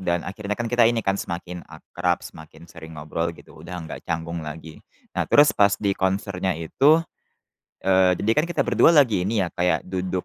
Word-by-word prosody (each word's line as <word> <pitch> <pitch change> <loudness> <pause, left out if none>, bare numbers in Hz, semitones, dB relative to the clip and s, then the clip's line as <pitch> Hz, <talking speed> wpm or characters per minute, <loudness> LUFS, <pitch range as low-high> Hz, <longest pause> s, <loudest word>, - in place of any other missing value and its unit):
dan 85 -2 0
akhirnya 105 +1 -5
kan 120 - -3
kita 120 0 +3
ini 115 -1 0
kan 95 0 +1
semakin 90 0 -6
akrab, 80 -1 -3
semakin 80 +1 -13
sering 80 -1 -12
ngobrol 80 +3 -3
gitu, - - -16
udah 90 - -8
nggak 80 - -8
canggung 85 0 -3
lagi. 80 +1 -9 0.3
Nah, - - -2
terus 145 +1 +6
pas 100 0 +3
di 100 -1 0
konsernya 95 -1 -1
itu 135 - +3 0.8
eee, 95 -1 +4
jadi 105 - +1
kan 150 - +3
kita 175 - -2
berdua - - +4
lagi 115 -11 +4
ini 105 +2 0
ya, - - -3
kayak 90 -2 0
duduk 90 0 -3
90 Hz, 190 wpm, -23 LUFS, 85-105 Hz, 0.8 s, terus